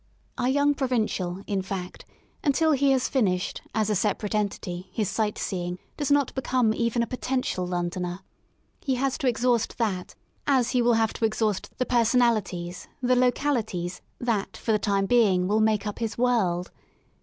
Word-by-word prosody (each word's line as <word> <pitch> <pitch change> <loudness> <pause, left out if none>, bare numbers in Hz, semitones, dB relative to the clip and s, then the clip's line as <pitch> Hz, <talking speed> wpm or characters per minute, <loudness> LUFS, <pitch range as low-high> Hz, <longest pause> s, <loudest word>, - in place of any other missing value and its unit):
Our 250 0 0
young 285 +2 +3
provincial, 215 -9 -1
in 200 -2 -1
fact, 185 -1 -6 0.4
until 315 +1 +3
he 280 -1 +3
has 265 -2 +3
finished, 185 -9 0
as 215 -2 +2
a 215 - +1
separate 210 +1 0
entity, 190 -3 -2
his 210 0 -1
sight 215 -2 -1
seeing, 180 -2 -3 0.2
does 290 -3 -2
not 285 -1 +3
become 255 -4 +1
even 235 +1 0
a - - 0
potential 255 -6 -2
Londoner. 175 +1 -3 0.6
He 265 -3 -1
has 270 +1 0
to 275 - 0
exhaust 240 -1 +1
that 195 -6 -2 0.3
as 260 -4 +3
he 250 - +2
will 240 0 +4
have 225 -1 +2
to 225 - 0
exhaust 215 -2 0
the 255 - 0
personalities, 225 -8 +1
the 255 0 +2
localities, 240 -8 0 0.2
that 230 -5 -1
for 225 - -2
the 215 - +3
time 200 -2 +1
being 195 -6 +3
will 210 +2 +2
make 215 -1 +2
up 210 - -4
his 225 -2 -2
^^ - - -28
world.'' 205 -8 +1
220 Hz, 170 wpm, -26 LUFS, 190-250 Hz, 0.6 s, will